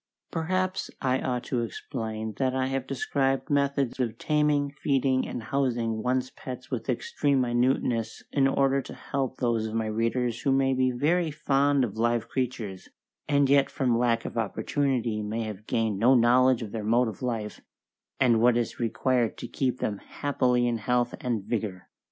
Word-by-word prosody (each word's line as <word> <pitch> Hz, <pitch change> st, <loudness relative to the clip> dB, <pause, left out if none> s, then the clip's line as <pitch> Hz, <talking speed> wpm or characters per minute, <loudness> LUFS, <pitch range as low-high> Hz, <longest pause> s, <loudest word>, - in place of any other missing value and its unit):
Perhaps 185 Hz, +3 st, -1 dB
I 130 Hz, -1 st, +1 dB
ought 125 Hz, -1 st, -2 dB
to 125 Hz, -3 st, -1 dB
explain 110 Hz, -1 st, -4 dB
that 130 Hz, -1 st, +1 dB
I 130 Hz, 0 st, +1 dB
have 135 Hz, -1 st, -2 dB
described 135 Hz, +1 st, -1 dB
methods 140 Hz, -2 st, +1 dB
of 115 Hz, -3 st, -1 dB
taming, 150 Hz, -1 st, +1 dB
feeding, 135 Hz, -2 st, +1 dB
and 120 Hz, -, -5 dB
housing 120 Hz, -4 st, -1 dB
one's 130 Hz, +1 st, 0 dB
pets 130 Hz, 0 st, -8 dB
with 125 Hz, 0 st, -4 dB
extreme 135 Hz, +3 st, +1 dB
minuteness 120 Hz, -2 st, 0 dB
in 135 Hz, -2 st, +3 dB
order 135 Hz, 0 st, +2 dB
to -, -, -10 dB
help 130 Hz, -2 st, -3 dB
those 115 Hz, -3 st, 0 dB
of 110 Hz, -, -5 dB
my 115 Hz, -1 st, 0 dB
readers 115 Hz, +2 st, -1 dB
who 140 Hz, -, +1 dB
may 135 Hz, 0 st, +3 dB
be 130 Hz, 0 st, +2 dB
very 160 Hz, +7 st, +1 dB
fond 140 Hz, -2 st, +2 dB
of 110 Hz, -3 st, -3 dB
live 120 Hz, 0 st, +1 dB
creatures, 115 Hz, -7 st, -3 dB, 0.4 s
and 140 Hz, -1 st, +4 dB
yet 140 Hz, 0 st, +4 dB
from 130 Hz, -4 st, +1 dB
lack 115 Hz, -1 st, +1 dB
of 115 Hz, -, -3 dB
opportunity 120 Hz, 0 st, -1 dB
may 110 Hz, +2 st, -2 dB
have 105 Hz, -1 st, -7 dB
gained 110 Hz, -3 st, 0 dB
no 125 Hz, +4 st, +5 dB
knowledge 125 Hz, +1 st, +4 dB
of 105 Hz, -, -7 dB
their 110 Hz, -2 st, -4 dB
mode 120 Hz, +3 st, +3 dB
of 110 Hz, -, -7 dB
life, 115 Hz, -4 st, -3 dB, 0.6 s
and 120 Hz, -4 st, +4 dB
what 120 Hz, 0 st, +5 dB
is 120 Hz, -2 st, -2 dB
required 120 Hz, 0 st, 0 dB
to -, -, -6 dB
keep 130 Hz, -2 st, -1 dB
them 100 Hz, -2 st, -1 dB
happily 125 Hz, -4 st, 0 dB
in 120 Hz, -1 st, 0 dB
health 120 Hz, +2 st, 0 dB
and 115 Hz, -5 st, -1 dB
vigour. 95 Hz, -6 st, -3 dB
125 Hz, 175 wpm, -27 LUFS, 115-135 Hz, 0.6 s, no